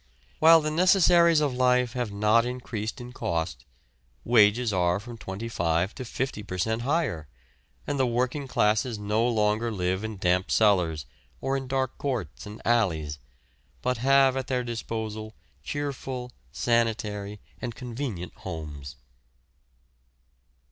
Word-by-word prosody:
While 165 +1 +8
the 155 0 -2
necessaries 170 -1 +5
of 145 -3 +1
life 125 -1 +2
have 125 -4 -2
not 105 +3 +3
increased 120 -2 -4
in 125 0 -9
cost, 80 - -3 0.6
wages 110 0 +4
are 90 0 +2
from 120 +3 -9
twenty 105 +1 -6
five 85 -2 0
to 130 - -6
fifty 125 -2 -3
per 95 -3 -6
cent. 110 +5 0
higher, 135 - -1 0.6
and 140 - -2
the 130 - +3
working 125 +4 -1
classes 110 0 +1
no 105 +3 +1
longer 110 0 +1
live 95 -1 -1
in 110 -1 -5
damp 90 0 +1
cellars 90 -8 +2 0.3
or 135 - -1
in 135 -1 -3
dark 130 -1 -2
courts 115 - -3
and 105 +1 -10
alleys, 80 -11 +1 0.6
but 125 -1 0
have 135 +1 +4
at 130 -1 -3
their 125 -1 0
disposal 110 -2 -5 0.3
cheerful, 135 -3 -4 0.2
sanitary, 105 0 -1 0.2
and 120 -2 -4
convenient 120 -7 -5
homes. 75 -6 -7
115 Hz, 135 wpm, -27 LUFS, 100-130 Hz, 0.6 s, While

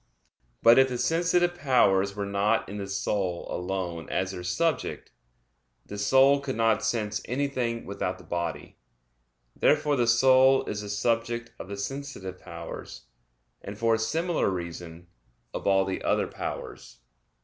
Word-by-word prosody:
But 115 +2 +8
if 130 0 +5
the 125 - -3
sensitive 175 +4 +2
powers 100 - +2
were 100 -1 -3
not 100 +3 +1
in 100 - -6
the 100 - -4
soul 95 -2 -2
alone 90 -2 -4
as 95 0 -1
their 90 -2 -7
subject, 160 - -1 0.7
the 105 - -7
soul 135 +6 +5
could 140 -2 -4
not 110 -1 +2
sense 110 -2 -1
anything 125 -3 -2
without 95 -2 -3
the - - -14
body. 85 -4 -4 0.8
Therefore 145 0 +3
the 120 -3 +1
soul 130 +2 +5
is 105 - -4
the 105 - -7
subject 115 +2 -1
of - - -7
the 100 +1 -6
sensitive 100 -5 -6
powers; - - -9 0.6
and 100 +1 -8
for 115 +1 +2
a 110 - +1
similar 165 - 0
reason, 85 -2 -6 0.5
of - - -4
all 95 -1 +4
the 95 -1 -3
other - - +1
powers. - - -7
110 Hz, 150 wpm, -27 LUFS, 95-130 Hz, 0.8 s, But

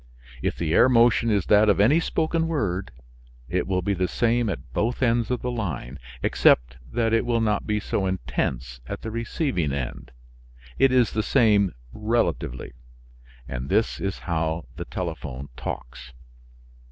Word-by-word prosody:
If - - -1
the 80 -2 -1
air 130 - +6
motion 115 -1 +4
is 100 -5 +1
that 105 0 +5
of 100 - +3
any 125 +11 +5
spoken 165 0 0
word 100 - -1 0.6
it - - -1
will 90 -2 0
be 100 - +1
the 90 -1 0
same 120 +2 +1
at 65 -8 -6
both 120 - 0
ends 115 -2 +2
of 125 -1 -2
the 125 - -1
line, 75 - -4 0.2
except - - +3
that 115 -1 +1
it 115 - +3
will 120 -1 +1
not 105 -2 0
be 105 0 +1
so 100 -1 -1
intense 65 -9 -3
at - - -5
the 110 - -4
receiving 115 - -1
end; 70 -3 -5 0.7
it 135 - +5
is 125 -3 +3
the 110 - 0
same 105 - +3 0.2
relatively. 105 - -1 0.8
And 65 +1 -5
this - - +1
is 95 0 -2
how 80 -1 -1
the - - -6
telephone 75 -6 -5
talks. 60 +1 -7
100 Hz, 160 wpm, -25 LUFS, 80-115 Hz, 0.8 s, air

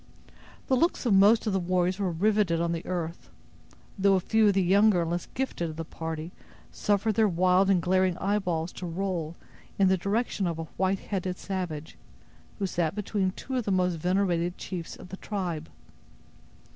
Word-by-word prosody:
The 265 - +2
looks 330 +1 +1
of 230 - +3
most 205 +4 +5
of 210 - 0
the 190 - +2
warriors 180 +1 0
were 195 -2 0
riveted 195 -1 +2
on 170 0 0
the 170 0 -3
earth; 170 -2 -4 0.7
though 195 0 +4
a - - +3
few 220 +4 +3
of 200 - +3
the 195 - +3
younger 195 0 +4
and 165 - -3
less 175 0 -2
gifted 240 -10 -2
of 155 - -7
the 165 +1 -5
party 160 +1 -5 0.4
suffered 210 +1 +1
their 220 +1 +3
wild 185 +1 +3
and 190 -2 +4
glaring 185 0 +2
eyeballs 180 -4 -1
to 180 - -7
roll 170 -2 -3 0.4
in 195 -1 +4
the 190 - +3
direction 200 +1 -1
of 165 -2 -2
a 165 - -3
white 190 +4 -1
headed 185 -2 -3
savage, 175 -6 -5 0.6
who 200 - -1
sat 175 -2 -1
between 205 -2 -1
two 260 +5 -4
of 245 - -1
the 200 - 0
most 180 -1 +2
venerated 175 0 0
chiefs 175 -3 -6
of 180 - -12
the 190 - -7
tribe. 175 -8 -4
185 Hz, 185 wpm, -28 LUFS, 170-200 Hz, 0.7 s, most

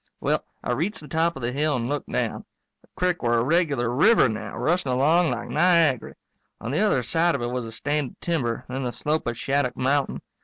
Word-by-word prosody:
Well, - - 0 0.2
I - - -2
reached 170 - -1
the 150 - -11
top 165 +3 +1
of 135 - -8
the 120 - 0
hill 145 +3 0
and 120 -1 -2
looked 145 +2 -3
down. - - -2 0.4
The - - -26
crick 180 -1 0
were 120 -1 +2
a 115 - +2
regular 145 -4 +1
river 185 - +5
now, 110 -3 -5
rushing 170 -4 0
along 155 +7 +3
like 120 -1 -3
Niagary. 160 -6 +2 0.4
On 115 - -5
the 145 - 0
other 200 -12 +2
side 165 +6 +1
of 135 - -3
it 120 - -2
was 125 -1 -3
a 115 - -7
stand 145 +3 -2
of - - -21
timber, 130 -8 -2
then 130 +1 -4
the 120 -1 -3
slope 155 -1 -1
of 120 -1 -2
Shattuck 135 -1 0
mountain. 135 +2 0
140 Hz, 225 wpm, -24 LUFS, 120-165 Hz, 0.4 s, river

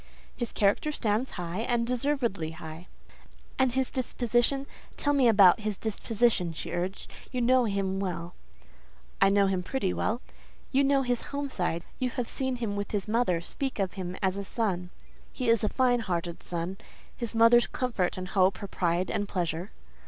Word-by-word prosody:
"His 240 -2 -3
character 205 +9 +2
stands 225 -2 0
high, 175 +1 -4
and 235 0 +1
deservedly 245 - 0
high." 160 +1 -9 0.7
"And 260 -1 +4
his 260 +1 0
disposition? 245 +1 0 0.3
Tell 290 - +1
me 270 -4 +4
about 200 -5 +7
his 210 -2 -2
disposition," 220 -4 0
she 155 - -6
urged; 180 +3 -3 0.2
"you 255 - -2
know 250 +1 +4
him 195 -2 -1
well." 175 -2 -3 0.9
"I 195 - +7
know 200 0 +4
him 190 -2 +1
pretty 190 -1 -1
well." 230 - 0 0.5
"You 275 +1 +4
know 275 0 +3
his 245 -2 -1
home 285 0 -3
side. 175 -7 -1 0.2
You 255 - +1
have 245 -1 -3
seen 260 -1 -2
him 230 -4 -3
with 205 0 -3
his 205 -1 -2
mother; 215 -6 +1
speak 265 +9 -4
of 195 -3 -1
him 185 -1 -5
as 190 0 +1
a 200 - -3
son." 190 -4 -1 0.4
"He 250 -3 -2
is 230 -2 +4
a 215 - +2
fine 250 -2 +3
hearted 175 -5 -3
son; 175 +2 -4 0.4
his 235 -2 -5
mother's 230 +1 +6
comfort 230 -10 -1
and 185 0 -5
hope, 190 -1 +3
her 200 - -6
pride 175 -1 0
and 205 0 -1
pleasure." 175 +1 -2
210 Hz, 175 wpm, -28 LUFS, 185-245 Hz, 0.9 s, about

